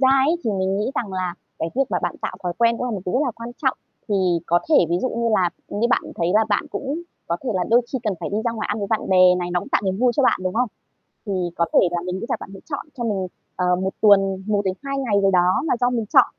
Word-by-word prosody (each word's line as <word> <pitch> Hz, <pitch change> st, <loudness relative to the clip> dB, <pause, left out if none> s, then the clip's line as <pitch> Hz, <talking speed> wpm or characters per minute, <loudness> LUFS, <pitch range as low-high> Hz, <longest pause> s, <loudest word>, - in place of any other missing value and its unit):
ra 260 Hz, -, +5 dB, 0.2 s
ấy, 335 Hz, -, +3 dB
thì 225 Hz, -, +1 dB
mình 190 Hz, -1 st, 0 dB
nghĩ 215 Hz, -, -1 dB
rằng 205 Hz, -5 st, -3 dB
là 185 Hz, -2 st, -2 dB, 0.2 s
cái 165 Hz, -, -1 dB
việc 275 Hz, -, +4 dB
mà -, -, +1 dB
bạn -, -, -1 dB
tạo -, -, -3 dB
thói 180 Hz, -, -1 dB
quen 235 Hz, 0 st, +3 dB
cũng 250 Hz, -, -3 dB
là 250 Hz, -, -2 dB
một 205 Hz, -4 st, -3 dB
thứ -, -, -1 dB
rất 255 Hz, -, +2 dB
là 270 Hz, -, 0 dB
quan 230 Hz, +1 st, -7 dB
trọng. 265 Hz, -2 st, +2 dB, 0.3 s
Thì 205 Hz, -, +1 dB, 0.3 s
có 175 Hz, -, +4 dB
thể 320 Hz, -, +3 dB, 0.2 s
ví 170 Hz, -, +2 dB
dụ 255 Hz, -, +1 dB
như 235 Hz, -1 st, -1 dB
là 180 Hz, -3 st, +2 dB, 0.2 s
như 215 Hz, +3 st, 0 dB
bạn -, -, +3 dB
thấy 170 Hz, 0 st, 0 dB
là 220 Hz, +1 st, +5 dB
bạn 205 Hz, -, +2 dB
cũng 280 Hz, +4 st, -3 dB, 0.3 s
có 170 Hz, -, -1 dB
thể 255 Hz, -, -1 dB
là 180 Hz, -1 st, +1 dB
đôi 235 Hz, +2 st, +6 dB
khi 260 Hz, -, 0 dB
cần 210 Hz, -4 st, 0 dB
phải -, -, -3 dB
đi 205 Hz, -, -1 dB
ra 235 Hz, -, +1 dB
ngoài 220 Hz, -1 st, -4 dB
ăn 205 Hz, -, -1 dB
với 200 Hz, -, -2 dB
bạn 220 Hz, -, 0 dB
bè 185 Hz, -1 st, +6 dB
này, 175 Hz, 0 st, -3 dB
nó 180 Hz, -, +1 dB
cũng -, -, -9 dB
tạo -, -, +2 dB
niềm 190 Hz, -1 st, 0 dB
vui 245 Hz, +1 st, +3 dB
cho 285 Hz, -, +3 dB
bạn, 250 Hz, -, +3 dB
đúng 185 Hz, 0 st, -2 dB
không? 245 Hz, +2 st, +1 dB, 0.6 s
Thì 205 Hz, -, -4 dB, 0.2 s
có 170 Hz, -, +2 dB
thể -, -, +7 dB
là 175 Hz, 0 st, -1 dB
mình 180 Hz, +1 st, -4 dB
nghĩ -, -, -4 dB
rằng -, -, 0 dB
bạn -, -, -8 dB
sẽ 195 Hz, -, -10 dB
chọn 285 Hz, -3 st, -5 dB
cho 240 Hz, -, -3 dB
mình, 200 Hz, -5 st, -1 dB, 0.3 s
ờ, 180 Hz, 0 st, +2 dB
1 190 Hz, +1 st, -2 dB
tuần, 195 Hz, -2 st, +4 dB
1-2 205 Hz, +7 st, -1 dB
ngày 250 Hz, -6 st, 0 dB
gì 195 Hz, -, +3 dB
đó 180 Hz, -1 st, +4 dB, 0.2 s
là 315 Hz, -, +2 dB
do 245 Hz, -, +4 dB
mình 235 Hz, -3 st, -1 dB
chọn. -, -, +8 dB
205 Hz, 300 wpm, -22 LUFS, 185-240 Hz, 0.6 s, chọn